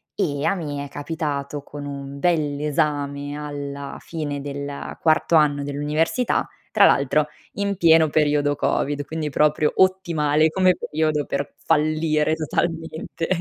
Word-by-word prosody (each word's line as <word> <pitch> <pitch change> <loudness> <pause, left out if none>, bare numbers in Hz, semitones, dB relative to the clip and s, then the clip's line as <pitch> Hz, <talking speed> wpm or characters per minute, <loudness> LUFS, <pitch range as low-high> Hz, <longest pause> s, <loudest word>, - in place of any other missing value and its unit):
e 145 -7 -1
a 195 - +2
me 145 -5 -4
è - - -10
capitato 145 -2 -4
con 145 +1 -9
un 140 0 -6
bell'esame 145 -2 0
alla 140 -1 -6
fine 145 -4 -4
del 140 0 -6
quarto 160 +1 +3
anno 145 -2 +4
dell'università, 150 - 0 0.2
tra 200 -2 +6
l'altro 145 +2 +3 0.3
in 200 0 -1
pieno 165 -3 +5
periodo 145 -1 +2
Covid, 145 +1 0
quindi 155 -1 -3
proprio 150 +1 +2
ottimale 160 -5 +3
come 185 +1 +3
periodo 155 -1 -1
per 140 +1 -3
fallire 155 0 +2
totalmente. 160 +1 -3
150 Hz, 125 wpm, -23 LUFS, 145-160 Hz, 0.3 s, tra